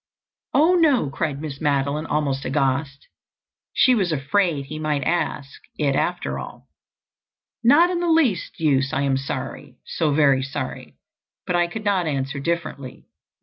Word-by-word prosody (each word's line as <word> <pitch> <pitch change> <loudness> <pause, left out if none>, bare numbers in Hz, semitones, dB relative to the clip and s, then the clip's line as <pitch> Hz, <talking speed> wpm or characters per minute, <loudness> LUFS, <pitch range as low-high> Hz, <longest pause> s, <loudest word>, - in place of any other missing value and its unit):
"Oh, 320 +5 +5
no," 295 - +3
cried 140 0 -2
Miss 145 -3 -7
Madeline 145 +1 0
almost 140 -3 -1
aghast. 135 0 -1 0.6
She 255 - +4
was 195 -7 +1
afraid 155 +1 0
he 155 +3 -7
might 150 -3 -1
ask 145 -3 -2 0.2
it 140 -3 +1
after 175 +4 -1
all. - - -10 1.0
"Not 320 +9 +6
in 350 - -1
the 345 -1 0
least 280 - +1
use. 140 -4 +1
I 135 - 0
am 135 -1 +1
sorry—so 140 +3 -4
very 140 -3 +3
sorry—but 135 +5 -7
I 175 0 +3
could 215 +5 -7
not 190 -4 +1
answer 140 0 -2
differently. 155 -4 -4
150 Hz, 140 wpm, -22 LUFS, 140-180 Hz, 1.0 s, Not